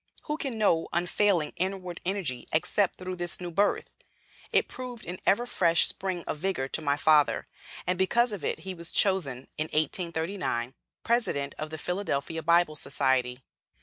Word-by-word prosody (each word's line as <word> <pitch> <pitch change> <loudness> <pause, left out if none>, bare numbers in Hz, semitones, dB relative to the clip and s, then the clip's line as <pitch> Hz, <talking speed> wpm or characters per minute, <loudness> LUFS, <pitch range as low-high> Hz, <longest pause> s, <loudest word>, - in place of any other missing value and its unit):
Who 300 - -2
can 265 -7 -3
know 170 -6 +3
unfailing 175 -1 +2
inward 185 -1 -3
energy 175 -11 -2
except 180 +5 +2
through 185 0 -5
this 175 0 -2
new 175 -1 -5
birth? 200 +4 +1 0.6
It - - +3
proved 250 -3 -7
an 180 +2 -5
ever 235 +5 +4
fresh 170 -8 +3
spring 185 -3 -2
of 150 - -3
vigor 180 -7 -1
to 160 - -1
my 145 -1 +1
father, 150 -1 +4 0.4
and 180 0 0
because 235 +6 +3
of 200 -7 -5
it 160 - -1
he 190 +2 -4
was 170 -1 -9
chosen, 145 -10 +1
in 155 - +2
1839, 160 -4 -1 0.3
president 185 -13 0
of 155 - -3
"The 160 - -6
Philadelphia 165 -3 -2
Bible 170 -1 +3
Society." 130 -3 0
175 Hz, 160 wpm, -28 LUFS, 155-195 Hz, 0.6 s, ever